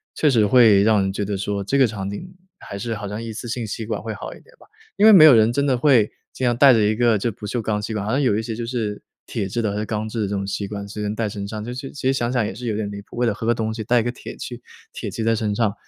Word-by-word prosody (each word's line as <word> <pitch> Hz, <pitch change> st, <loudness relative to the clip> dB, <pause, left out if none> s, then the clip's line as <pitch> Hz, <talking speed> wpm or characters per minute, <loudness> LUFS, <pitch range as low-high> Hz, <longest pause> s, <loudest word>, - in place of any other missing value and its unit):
确 150 Hz, -, +2 dB
实 115 Hz, -5 st, +3 dB
会 105 Hz, -3 st, +6 dB
让 110 Hz, -2 st, +4 dB
人 95 Hz, 0 st, 0 dB
觉 100 Hz, +1 st, -3 dB
得 100 Hz, 0 st, -3 dB
说 100 Hz, +1 st, -3 dB
这 140 Hz, -, 0 dB
个 135 Hz, -, +6 dB
场 100 Hz, -2 st, -5 dB
景 180 Hz, -, -8 dB, 0.3 s
还 100 Hz, -, -8 dB
是 115 Hz, 0 st, -3 dB
好 105 Hz, -1 st, -6 dB
像 105 Hz, +2 st, -5 dB
一 115 Hz, -1 st, -6 dB
次 115 Hz, +2 st, -7 dB
性 120 Hz, -1 st, -3 dB
吸 110 Hz, +1 st, -5 dB
管 110 Hz, -2 st, -3 dB
会 110 Hz, 0 st, -5 dB
好 100 Hz, -, -7 dB
一 -, -, -14 dB
点 -, -, -23 dB
吧， -, -, -20 dB, 0.3 s
因 205 Hz, +3 st, +3 dB
为 220 Hz, -, +9 dB
没 175 Hz, -6 st, +9 dB
有 150 Hz, -, +9 dB
人 110 Hz, +1 st, +4 dB
真 140 Hz, +4 st, 0 dB
的 135 Hz, -3 st, +2 dB
会 120 Hz, -5 st, +4 dB, 0.2 s
经 130 Hz, -, -3 dB
常 120 Hz, -1 st, +2 dB
带 135 Hz, +2 st, +7 dB
着 115 Hz, -, +4 dB
一 110 Hz, +1 st, +1 dB
个 115 Hz, -2 st, +3 dB
就 115 Hz, +4 st, -1 dB
不 105 Hz, +1 st, -9 dB
锈 120 Hz, +4 st, -2 dB
钢 105 Hz, -1 st, -1 dB
吸 110 Hz, +1 st, -4 dB
管， 100 Hz, -1 st, -3 dB
好 110 Hz, -, -2 dB
像 140 Hz, +3 st, +1 dB
有 115 Hz, -6 st, +2 dB
一 -, -, 0 dB
些 110 Hz, -1 st, -4 dB
就 120 Hz, -, -5 dB
是 115 Hz, -4 st, -3 dB, 0.2 s
铁 95 Hz, -, -3 dB
制 120 Hz, +5 st, -3 dB
的 110 Hz, -3 st, 0 dB
还 105 Hz, -, -4 dB
是 110 Hz, -, -2 dB
钢 110 Hz, 0 st, -3 dB
制 110 Hz, 0 st, -4 dB
的 105 Hz, -, 0 dB
这 100 Hz, -, -3 dB
种 100 Hz, 0 st, -2 dB
吸 100 Hz, 0 st, -3 dB
管 100 Hz, 0 st, -6 dB
随 105 Hz, +1 st, -7 dB
身 105 Hz, 0 st, -2 dB
带 115 Hz, 0 st, -1 dB
身 100 Hz, -1 st, -5 dB
上， 105 Hz, 0 st, -6 dB
就 120 Hz, -, -5 dB
是 130 Hz, +2 st, -6 dB
其 145 Hz, -, -9 dB
实 135 Hz, -, +3 dB
想 120 Hz, -2 st, -1 dB
想 120 Hz, -4 st, +1 dB
也 -, -, -4 dB
是 120 Hz, +4 st, -7 dB
有 110 Hz, -, -1 dB
点 105 Hz, -1 st, -3 dB
离 100 Hz, -, -7 dB
谱， 100 Hz, -, -15 dB
为 125 Hz, -, +1 dB
了 115 Hz, -, +1 dB
喝 110 Hz, +2 st, -5 dB
个 120 Hz, -, +3 dB
东 110 Hz, -1 st, -2 dB
西， 110 Hz, -1 st, -5 dB
带 120 Hz, +1 st, +3 dB
一 -, -, -3 dB
个 120 Hz, -, -1 dB
铁 -, -, -10 dB
去 120 Hz, -1 st, -7 dB, 0.3 s
铁 -, -, -5 dB
器 110 Hz, -, -4 dB
在 115 Hz, 0 st, +2 dB
身 105 Hz, -2 st, -1 dB
上， 110 Hz, -3 st, +1 dB
110 Hz, 370 characters per minute, -22 LUFS, 105-120 Hz, 0.3 s, 为